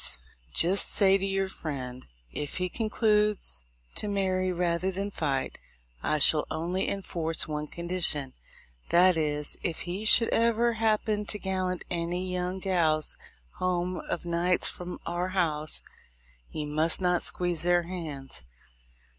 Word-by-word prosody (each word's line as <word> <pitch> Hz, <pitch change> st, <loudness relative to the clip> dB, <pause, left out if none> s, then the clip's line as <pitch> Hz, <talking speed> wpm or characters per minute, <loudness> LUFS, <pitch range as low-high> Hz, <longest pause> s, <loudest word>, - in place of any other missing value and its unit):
— -, -, -27 dB
Jist 185 Hz, +4 st, +4 dB
say 195 Hz, -1 st, +4 dB
to 195 Hz, -, -2 dB
your 195 Hz, 0 st, 0 dB
friend, 130 Hz, -8 st, -6 dB, 0.2 s
if 145 Hz, -, -3 dB
he 180 Hz, 0 st, -1 dB
concludes 210 Hz, -, +1 dB, 0.3 s
to 210 Hz, -, -1 dB
marry 185 Hz, -2 st, 0 dB
rather 175 Hz, +1 st, 0 dB
than 195 Hz, +2 st, -3 dB
fight, 140 Hz, -7 st, -2 dB, 0.4 s
I 155 Hz, -, +1 dB
shall 150 Hz, +1 st, +5 dB
only 175 Hz, +4 st, -2 dB
in 195 Hz, -1 st, -3 dB
force 165 Hz, -2 st, -1 dB
one 150 Hz, 0 st, -3 dB
condition, 170 Hz, -6 st, 0 dB, 0.6 s
that 180 Hz, +1 st, +5 dB
is, 150 Hz, -2 st, -1 dB
if 165 Hz, -2 st, -2 dB
he 180 Hz, +4 st, -4 dB
should 230 Hz, +1 st, +6 dB
ever 235 Hz, +1 st, +2 dB
happen 215 Hz, -1 st, 0 dB
to 210 Hz, -, -2 dB
gallant 185 Hz, -2 st, -2 dB
any 175 Hz, +2 st, -1 dB
young 180 Hz, +1 st, -2 dB
gals 170 Hz, -5 st, +1 dB, 0.4 s
home 180 Hz, 0 st, 0 dB
of 175 Hz, -, -3 dB
nights 175 Hz, +1 st, +3 dB
from 180 Hz, 0 st, -4 dB
our 175 Hz, +1 st, -1 dB
house, 155 Hz, -4 st, +1 dB, 0.7 s
he 150 Hz, -, -4 dB
must 155 Hz, +2 st, +2 dB
not 180 Hz, -1 st, +2 dB
squeeze 175 Hz, -3 st, -1 dB
their 175 Hz, 0 st, +3 dB
hands. 155 Hz, -, -5 dB
180 Hz, 140 wpm, -28 LUFS, 160-190 Hz, 0.7 s, should